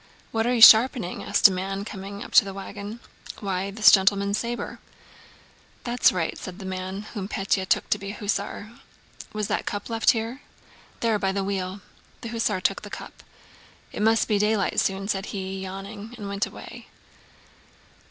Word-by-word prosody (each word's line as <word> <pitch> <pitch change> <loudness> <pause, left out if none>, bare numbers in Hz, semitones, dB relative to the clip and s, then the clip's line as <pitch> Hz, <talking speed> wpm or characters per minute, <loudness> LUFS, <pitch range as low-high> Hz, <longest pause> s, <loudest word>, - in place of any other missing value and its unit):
"What 225 +1 0
are 245 - +2
you 230 - +6
sharpening?" 225 -4 +7
asked - - +6
a - - -1
man 195 +2 -3
coming 200 -1 -7
up - - -11
to - - +7
the 195 -1 -7
wagon. 200 +3 -7 0.4
"Why, 195 -1 -2
this 215 +2 +6
gentleman's 200 +1 +3
saber." 240 0 -4 1.0
"That's 240 0 +3
right," 175 -3 -2
said 185 -1 -8
the 195 - -9
man, 190 +1 -5
whom 200 -4 -4
Pétya 195 -1 -1
took - - +2
to 210 - +2
be 200 - -8
an 205 - -6
hussar. 205 +1 -3 0.6
"Was 215 -1 -3
the 215 - 0
cup 205 +3 -5
left 225 -1 +2
here?" 230 +4 -4 0.6
"There, 225 -3 +1
by 195 -1 0
the 195 0 -2
wheel!" 190 0 -3 0.4
The 230 - -6
hussar 225 -4 -1
took - - 0
the - - -9
cup. - - -9 0.7
"It - - -5
must 225 +1 +3
be 210 -2 +1
daylight 210 -1 +1
soon," 195 0 -1
said 195 -1 -2
he, 190 -1 -5
yawning, 200 +4 -8
and 205 -3 -7
went 200 +1 -1
away. - - -11
200 Hz, 175 wpm, -25 LUFS, 195-220 Hz, 1.0 s, sharpening